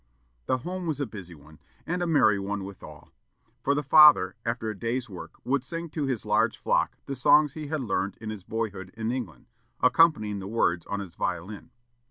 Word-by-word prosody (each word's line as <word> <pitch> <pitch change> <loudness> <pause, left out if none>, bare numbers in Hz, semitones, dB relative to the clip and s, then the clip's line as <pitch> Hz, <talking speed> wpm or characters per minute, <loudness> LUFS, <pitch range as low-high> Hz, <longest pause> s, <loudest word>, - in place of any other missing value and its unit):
The 130 - +2
home 180 +6 -5
was 150 -3 -2
a 140 - 0
busy 95 -7 -9
one, 75 +1 -17 0.3
and 180 +1 -2
a 175 - 0
merry 130 -11 +4
one 100 0 -3
withal; 95 0 -11 0.5
for 140 - +1
the 145 - -1
father, 145 -10 +7
after 115 -1 -2
the - - -3
day's 120 +2 -2
work, 95 -5 -10
would 135 0 0
sing 165 +5 -5
to 150 -3 -2
his 125 -5 -2
large 105 0 +2
flock - - 0
the 140 - -4
songs 140 +2 +4
he 155 -2 -6
had 155 0 -2
learned 100 -5 -2
in 110 -1 -5
his 105 -4 -8
boyhood 100 -3 -4
in 110 +1 -2
England, 110 - -5 0.3
accompanying 125 -7 +3
the 95 - -7
words 90 -6 0
on 100 0 -3
his 95 -4 -9
violin. 90 +5 -4
115 Hz, 200 wpm, -27 LUFS, 100-140 Hz, 0.5 s, father